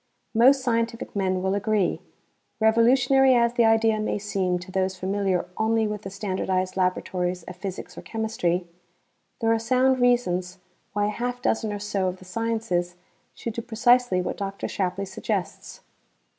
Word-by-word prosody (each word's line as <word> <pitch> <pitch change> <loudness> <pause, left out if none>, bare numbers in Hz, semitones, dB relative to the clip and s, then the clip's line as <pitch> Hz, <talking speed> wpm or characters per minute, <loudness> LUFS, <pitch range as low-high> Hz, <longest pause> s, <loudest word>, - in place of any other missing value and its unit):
Most 260 +4 +5
scientific 230 -2 -1
men 185 -2 0
will 190 0 +1
agree. 205 -1 0 0.6
Revolutionary 245 +4 +4
as 235 0 +3
the 240 -1 +3
idea 225 -1 +3
may 215 - -1
seem 195 -3 -1
to 185 +2 -10
those 190 0 -1
familiar 190 -1 0
only 220 0 +2
with 210 -1 -3
the 195 - -7
standardized 190 -2 -2
laboratories 180 -1 -1
of 180 - -9
physics 190 -1 -7
or - - -8
chemistry, 220 -6 -1 0.8
there 225 0 +2
are 225 - +1
sound 255 +3 +2
reasons 185 -7 +1 0.4
why 205 0 +1
a - - 0
half 245 +3 -3
dozen 220 -3 0
or 205 - -3
so 200 -2 -1
of 185 0 -3
the 185 - -15
sciences 220 -4 -2 0.4
should 230 - -5
do 230 - -4
precisely 240 -3 +3
what - - -4
Dr. 195 0 -4
Shapley 195 +1 -2
suggests. 190 - -4
210 Hz, 160 wpm, -25 LUFS, 185-230 Hz, 0.8 s, Most